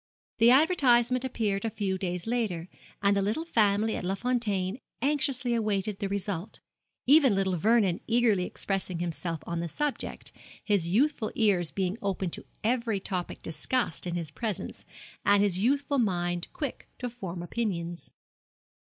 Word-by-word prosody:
The 230 Hz, +1 st, +7 dB
advertisement 255 Hz, -4 st, +4 dB
appeared 215 Hz, -6 st, -1 dB
a 225 Hz, -, 0 dB
few 195 Hz, -3 st, -1 dB
days 180 Hz, -2 st, -3 dB
later, 220 Hz, -8 st, -1 dB, 0.4 s
and 200 Hz, 0 st, +4 dB
the 200 Hz, -, +2 dB
little 215 Hz, +12 st, -1 dB
family 215 Hz, -6 st, +2 dB
at -, -, -4 dB
Les 190 Hz, +2 st, 0 dB
Fontaines 220 Hz, -4 st, 0 dB, 0.2 s
anxiously 265 Hz, -3 st, 0 dB
awaited 210 Hz, -3 st, -1 dB
the 200 Hz, -2 st, -2 dB
result, 200 Hz, -2 st, -3 dB, 0.5 s
even 275 Hz, -5 st, +6 dB
little 190 Hz, -1 st, +1 dB
Vernon 200 Hz, 0 st, +3 dB
eagerly 225 Hz, -5 st, +3 dB
expressing 190 Hz, -2 st, -2 dB
himself 170 Hz, -1 st, -3 dB
on 170 Hz, 0 st, -3 dB
the 170 Hz, -, -2 dB
subject, 295 Hz, -, -3 dB, 0.3 s
his 200 Hz, -6 st, +1 dB
youthful 230 Hz, -, +1 dB
ears 195 Hz, -7 st, +2 dB
being 190 Hz, +3 st, -2 dB
open 190 Hz, -3 st, -1 dB
to -, -, -6 dB, 0.2 s
every 230 Hz, -2 st, +1 dB
topic 185 Hz, -2 st, -4 dB
discussed 180 Hz, +2 st, -1 dB
in 175 Hz, -, -2 dB
his 165 Hz, -4 st, -4 dB
presence, 200 Hz, +2 st, -4 dB, 0.4 s
and 200 Hz, 0 st, +5 dB
his 190 Hz, -3 st, +1 dB
youthful 275 Hz, +5 st, +2 dB
mind 175 Hz, -5 st, 0 dB
quick 285 Hz, -5 st, -5 dB
to 250 Hz, -, -3 dB
form 190 Hz, -8 st, -6 dB
opinions. 175 Hz, -4 st, -3 dB
205 Hz, 150 wpm, -28 LUFS, 180-240 Hz, 0.5 s, The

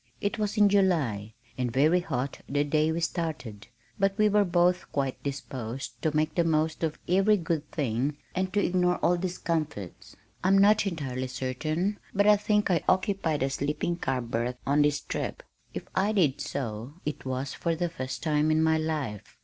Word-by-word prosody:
It 205 Hz, +3 st, -2 dB
was 210 Hz, +1 st, -1 dB
in 205 Hz, -1 st, +6 dB
July, 150 Hz, -, +1 dB, 0.2 s
and 125 Hz, -2 st, 0 dB
very 150 Hz, +8 st, +4 dB
hot 135 Hz, -6 st, -3 dB
the 145 Hz, +2 st, +2 dB
day 155 Hz, +2 st, +2 dB
we 165 Hz, +1 st, -2 dB
started, 145 Hz, -, -3 dB, 0.3 s
but 195 Hz, 0 st, +2 dB
we 215 Hz, -1 st, +4 dB
were 210 Hz, 0 st, +4 dB
both 180 Hz, 0 st, +2 dB
quite 135 Hz, -2 st, -2 dB
disposed 135 Hz, -2 st, -5 dB
to 155 Hz, -1 st, 0 dB
make 155 Hz, 0 st, +1 dB
the 170 Hz, -, +2 dB
most 160 Hz, -1 st, +1 dB
of 155 Hz, -1 st, -1 dB
every 195 Hz, +4 st, +4 dB
good 160 Hz, -4 st, -2 dB
thing 140 Hz, +1 st, -1 dB, 0.2 s
and 185 Hz, 0 st, -1 dB
to 205 Hz, 0 st, +2 dB
ignore 180 Hz, 0 st, +2 dB
all 175 Hz, -, +4 dB
discomforts. 165 Hz, -, -3 dB, 0.3 s
I'm 190 Hz, +1 st, +5 dB
not 205 Hz, +1 st, +5 dB
entirely 135 Hz, -7 st, -3 dB
certain, 155 Hz, +10 st, -2 dB, 0.2 s
but 200 Hz, +1 st, +3 dB
I 210 Hz, 0 st, +7 dB
think 210 Hz, -1 st, +1 dB
I 170 Hz, -4 st, +2 dB
occupied 185 Hz, -7 st, +1 dB
a 135 Hz, -, 0 dB
sleeping 150 Hz, +5 st, -1 dB
car 135 Hz, -6 st, -1 dB
berth 120 Hz, +1 st, -2 dB
on 145 Hz, +2 st, +3 dB
this 145 Hz, 0 st, +2 dB
trip; -, -, -4 dB, 0.3 s
if -, -, -4 dB
I 200 Hz, +3 st, +1 dB
did 155 Hz, -11 st, +2 dB
so 130 Hz, -1 st, -4 dB
it 150 Hz, -1 st, -4 dB
was 130 Hz, +1 st, -3 dB
for 170 Hz, -1 st, -1 dB
the 175 Hz, +2 st, -1 dB
first 130 Hz, -6 st, -5 dB
time 155 Hz, -1 st, +2 dB
in 155 Hz, 0 st, +3 dB
my 160 Hz, 0 st, +3 dB
life. 150 Hz, -10 st, -4 dB
155 Hz, 180 wpm, -28 LUFS, 135-180 Hz, 0.3 s, I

